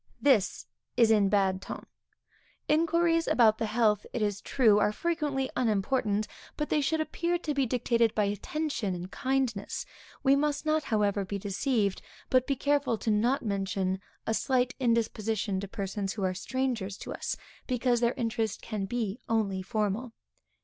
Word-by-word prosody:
This 255 -9 +2 0.3
is 230 -2 +5
in 205 -3 +4
bad 190 -2 +2
ton. - - -7 0.8
Inquiries 330 +1 +3
about 220 -3 +4
the 225 - 0
health, 215 -2 +2
it 230 - 0
is 205 -1 -1
true, 220 -6 +4
are 210 - +3
frequently 295 -1 -1
unimportant, 215 -2 +1 0.3
but 300 - -2
they 300 - +2
should 320 +3 +1
appear 340 +2 0
to 315 -3 -3
be 275 -2 +1
dictated 235 -2 +1
by 210 - +3
attention 210 +1 -2
and 180 +2 -7
kindness. 260 -6 -1 0.4
We 275 0 +5
must 295 +1 0
not 310 -1 +1
however 205 -2 +1
be 200 +1 -4
deceived, 200 +1 0 0.3
but 255 -1 +4
be 275 - +1
careful 280 -4 +1
not 235 +6 +2
to - - -11
mention 195 -2 -1 0.3
a 225 - 0
slight 255 +1 +1
indisposition 225 -4 0
to 200 - -5
persons 195 0 -3
who 205 - -4
are 185 0 +1
strangers 230 -2 -2
to - - -6
us, - - -3 0.3
because 245 -1 +1
their 235 +1 +1
interest 225 -3 -2
can 210 -3 -3
be 220 0 -2
only 205 -4 +1
formal. 215 +3 -2
225 Hz, 160 wpm, -29 LUFS, 205-265 Hz, 0.8 s, is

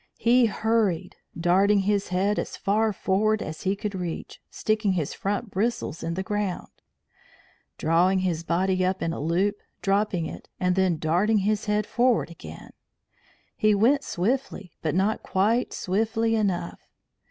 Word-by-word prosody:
He 240 +1 +4
hurried, 220 -5 0 0.2
darting 195 +4 +4
his 200 0 0
head 195 +3 0
as - - -5
far 215 +2 +1
forward 210 +2 +1
as 155 0 -7
he 195 +1 0
could 205 0 -4
reach, 180 -3 -5
sticking 215 -2 0
his 160 -6 -2
front 205 +2 -3
bristles 200 -5 -2
in 165 - -3
the 190 - -2
ground, 205 -2 -3 1.1
drawing 175 +4 +3
his 170 -3 -1
body 185 +2 +1
up 185 +1 0
in 165 - -1
a - - -5
loop, 185 +7 0 0.3
dropping 195 -3 +1
it, - - -8
and 180 0 +1
then 190 -3 +2
darting 175 +8 +2
his 215 0 0
head 210 -1 +1
forward 240 -7 +1
again. 80 - -11 0.8
He 215 -1 +3
went 265 +8 +3
swiftly, 205 -2 -2
but 160 0 -1
not 200 +4 +1
quite 220 +6 +1
swiftly 225 +4 0
enough. 185 -5 -1
195 Hz, 150 wpm, -25 LUFS, 180-215 Hz, 1.1 s, He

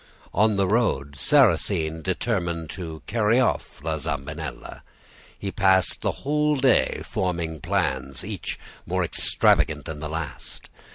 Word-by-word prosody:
On 105 +2 +3
the 100 -1 +2
road, 80 - +1
Sarrasine 80 +3 +3
determined 85 -4 -2
to 80 -5 -7
carry 115 +1 +2
off 125 - -1
La 80 -1 -1
Zambinella. 75 -2 -5 0.6
He 100 - -4
passed 95 -3 +3
the - - +1
whole 150 +1 +2
day 130 - +2
forming 85 -4 -2
plans, - - -1
each - - -4 0.3
more - - 0
extravagant - - +2
than 80 -2 -6
the 75 0 -5
last. 80 -1 -6
85 Hz, 125 wpm, -24 LUFS, 80-105 Hz, 0.6 s, On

